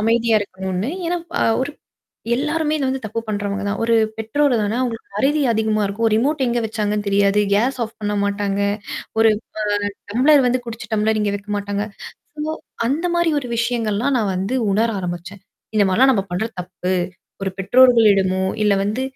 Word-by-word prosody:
அமைதியா 225 Hz, +1 st, +3 dB
இருக்கணும்ன்னு. 190 Hz, +2 st, -3 dB, 0.2 s
ஏனா 355 Hz, -, 0 dB, 0.2 s
அ -, -, +3 dB, 0.2 s
ஒரு 275 Hz, -, -3 dB, 0.7 s
எல்லாருமே 305 Hz, +2 st, 0 dB
இத 285 Hz, -, -1 dB
வந்து 265 Hz, 0 st, -3 dB
தப்பு 225 Hz, +2 st, -3 dB
பண்றவங்க 205 Hz, -1 st, -2 dB
தான். 205 Hz, +2 st, -2 dB
ஒரு 230 Hz, 0 st, +3 dB, 0.2 s
பெற்றோர் 255 Hz, +5 st, +1 dB
தானே 210 Hz, +3 st, -1 dB
அவங்களுக்கு 235 Hz, -3 st, -3 dB
மறதி 290 Hz, +7 st, +2 dB
அதிகமா 220 Hz, -1 st, +1 dB
இருக்கும். 205 Hz, +3 st, -1 dB
ஒரு 215 Hz, -, +1 dB
ரிமோட் 275 Hz, +3 st, +1 dB
எங்க 240 Hz, 0 st, 0 dB
வச்சாங்கன்னு 210 Hz, -1 st, -2 dB
தெரியாது. 200 Hz, +1 st, +3 dB
கேஸ் 250 Hz, +6 st, +1 dB
ஆஃப் 225 Hz, -, -11 dB
பண்ண 210 Hz, 0 st, -1 dB
மாட்டாங்க. 200 Hz, 0 st, -1 dB, 0.6 s
ஒரு 225 Hz, 0 st, +6 dB, 0.6 s
அ -, -, -29 dB, 0.2 s
டம்ளர் 275 Hz, +5 st, +5 dB
வந்து 250 Hz, +1 st, +1 dB
குடிச்சு 225 Hz, -1 st, -7 dB
டம்ளர் 215 Hz, 0 st, +1 dB
இங்க 205 Hz, -1 st, 0 dB
வக்க 205 Hz, +1 st, -11 dB
மாட்டாங்க. 205 Hz, 0 st, -2 dB, 0.5 s
சோ -, -, -6 dB, 0.5 s
அந்த 310 Hz, +7 st, 0 dB
மாரி 345 Hz, -1 st, +2 dB
ஒரு 260 Hz, -, -7 dB
விஷயங்கள்லாம் 235 Hz, +2 st, 0 dB
நான் 205 Hz, -4 st, 0 dB
வந்து 195 Hz, +7 st, -2 dB, 0.2 s
உணர 220 Hz, +4 st, +2 dB
ஆரம்பிச்சேன். 180 Hz, +2 st, -6 dB, 0.3 s
இந்த 205 Hz, -, +5 dB
மாரிலாம் 260 Hz, +8 st, +5 dB
நம்ம 195 Hz, -3 st, 0 dB
பண்றது 220 Hz, +6 st, -2 dB
தப்பு. 180 Hz, +1 st, -3 dB, 0.5 s
ஒரு 195 Hz, -, -1 dB
பெற்றோர்களிடமோ, 200 Hz, -4 st, +4 dB, 0.2 s
இல்ல 210 Hz, -1 st, +4 dB
வந்து 215 Hz, +6 st, -1 dB
220 Hz, 170 wpm, -20 LUFS, 200-250 Hz, 0.7 s, ஒரு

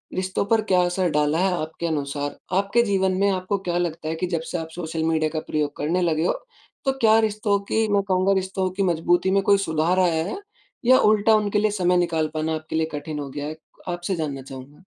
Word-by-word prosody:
रिश्तों 185 Hz, +1 st, -1 dB
पर 225 Hz, +1 st, +2 dB
क्या 180 Hz, -1 st, +5 dB
असर 175 Hz, 0 st, 0 dB
डाला 150 Hz, +2 st, +1 dB
है? 190 Hz, 0 st, +2 dB
आपके 160 Hz, +2 st, -5 dB
अनुसार, 145 Hz, -2 st, -3 dB, 0.2 s
आपके 200 Hz, +4 st, +2 dB
जीवन 190 Hz, -3 st, +1 dB
में 200 Hz, 0 st, +3 dB
आपको 185 Hz, +2 st, -1 dB
क्या 175 Hz, 0 st, 0 dB
लगता 165 Hz, -2 st, -2 dB
है 160 Hz, -, -2 dB
कि 180 Hz, +2 st, -2 dB
जब 170 Hz, -2 st, -1 dB
से -, -, -1 dB
आप 160 Hz, 0 st, -6 dB
सोशल 160 Hz, -2 st, -3 dB
मीडिया 160 Hz, -1 st, +1 dB
का 155 Hz, -, -1 dB
प्रयोग 150 Hz, -1 st, -1 dB
करने 165 Hz, +5 st, 0 dB
लगे 165 Hz, -2 st, +1 dB
हो, -, -, +2 dB, 0.5 s
तो 270 Hz, -, +2 dB
क्या 220 Hz, -1 st, +6 dB
रिश्तों 210 Hz, -2 st, +1 dB
की, 220 Hz, 0 st, +2 dB
मैं 200 Hz, -, +4 dB
कहूँगा 190 Hz, 0 st, +2 dB
रिश्तों 190 Hz, 0 st, -1 dB
की 195 Hz, -, +2 dB
मजबूती 175 Hz, +1 st, +2 dB
में 195 Hz, -, +3 dB
कोई 200 Hz, +1 st, +5 dB
सुधार 160 Hz, +4 st, +1 dB
आया 165 Hz, -3 st, +2 dB
है। 195 Hz, -, -4 dB, 0.5 s
या 255 Hz, +1 st, +7 dB
उल्टा 215 Hz, +1 st, +4 dB
उनके 210 Hz, -1 st, +1 dB
लिए 215 Hz, 0 st, +2 dB
समय 180 Hz, -3 st, +2 dB
निकाल 165 Hz, -3 st, +1 dB
पाना 155 Hz, +1 st, -1 dB
आपके 155 Hz, 0 st, -6 dB
लिए 160 Hz, -, +2 dB
कठिन 150 Hz, +1 st, -5 dB
हो 140 Hz, -1 st, -5 dB
गया 145 Hz, +2 st, -5 dB
है? 155 Hz, +1 st, -6 dB, 0.3 s
आपसे 175 Hz, +1 st, -2 dB
जानना 145 Hz, -4 st, -3 dB
चाहूँगा। 135 Hz, +4 st, -11 dB
175 Hz, 225 wpm, -23 LUFS, 155-195 Hz, 0.5 s, या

